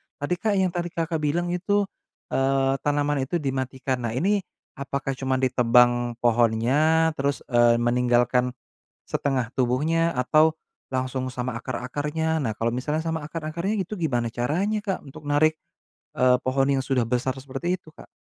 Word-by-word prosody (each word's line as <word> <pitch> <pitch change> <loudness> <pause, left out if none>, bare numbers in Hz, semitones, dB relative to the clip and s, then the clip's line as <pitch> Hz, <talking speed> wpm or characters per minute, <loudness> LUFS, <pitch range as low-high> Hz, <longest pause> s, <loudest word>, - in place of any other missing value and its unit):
tadi, 145 +5 -2
Kak, 215 0 +1
yang 190 -2 +2
tadi 175 0 -2
Kakak 165 -1 -1
bilang 170 +4 0
itu, 200 +3 +1 0.5
eee, 135 0 +1
tanaman 145 0 +1
itu 175 - -2
dimatikan. 130 -3 -2
Nah 115 - -4
ini 200 +10 +2 0.4
apakah 140 0 -3
cuma 130 0 -1
ditebang 120 -1 +3
pohonnya, 120 +8 +3
terus, 140 +1 -1
eee, 120 -1 +5
meninggalkan, 125 +1 +2 0.5
setengah 130 -4 -1
tubuhnya 155 +7 +1
atau 155 +5 +4 0.4
langsung 130 0 -1
sama 125 -1 -3
akar-akarnya? 145 +6 -2
Nah 115 - 0
kalau 115 +2 0
misalnya 150 +6 -1
sama 160 -2 -2
akar-akarnya 170 +6 -3
gitu 200 +4 -6
gimana 125 -8 0
caranya, 165 - 0
Kak, 195 -3 -2
untuk 150 +3 -11
narik, 155 +2 +3 0.6
eee, 125 0 +5
pohon 135 +1 +1
yang 135 -1 +2
sudah 130 -2 +1
besar 125 +2 -1
seperti 140 +7 -2
itu, 160 - -17
Kak? - - -14
135 Hz, 150 wpm, -25 LUFS, 125-160 Hz, 0.6 s, eee